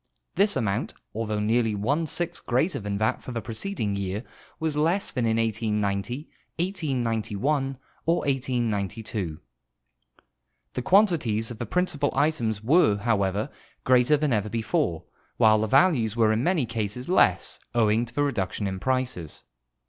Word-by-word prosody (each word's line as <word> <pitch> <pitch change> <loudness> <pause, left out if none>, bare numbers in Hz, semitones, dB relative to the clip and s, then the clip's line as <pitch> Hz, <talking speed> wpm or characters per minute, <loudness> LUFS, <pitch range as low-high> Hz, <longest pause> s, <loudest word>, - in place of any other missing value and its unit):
This 200 +1 +3
amount, 100 -3 -1 0.2
although 110 -1 -2
nearly 110 +1 +1
one 145 +11 0
sixth 175 +2 -3
greater 135 +9 +1
than 100 -2 -3
that 110 +1 0
for - - -8
the 120 - -2
preceding 115 - -2
year, 100 +2 -3 0.4
was 160 -2 -1
less 165 +6 +2
than 125 -5 0
in 110 0 +1
1890, 110 - -1 0.3
1891, 135 - -1 0.3
or 165 - +4
1892. 110 - -2 1.3
The 125 - -2
quantities 135 - +3
of 115 - -8
the 120 - -4
principal 150 - 0
items 115 -9 0
were, 125 - +4
however, 105 +2 0 0.3
greater 125 +3 +4
than 145 -3 0
ever 105 -1 0
before, 115 - -1 0.3
while 110 -1 +5
the 110 - 0
values 120 - +3
were 110 -2 +3
in 110 +3 0
many 170 -5 +2
cases 115 +2 -3
less, 95 - +2 0.2
owing 110 0 +3
to 120 +1 -11
the 145 - +1
reduc 120 -10 0
tion 105 - -3
in 95 -1 -3
prices. 125 - -2
115 Hz, 145 wpm, -26 LUFS, 105-145 Hz, 1.3 s, while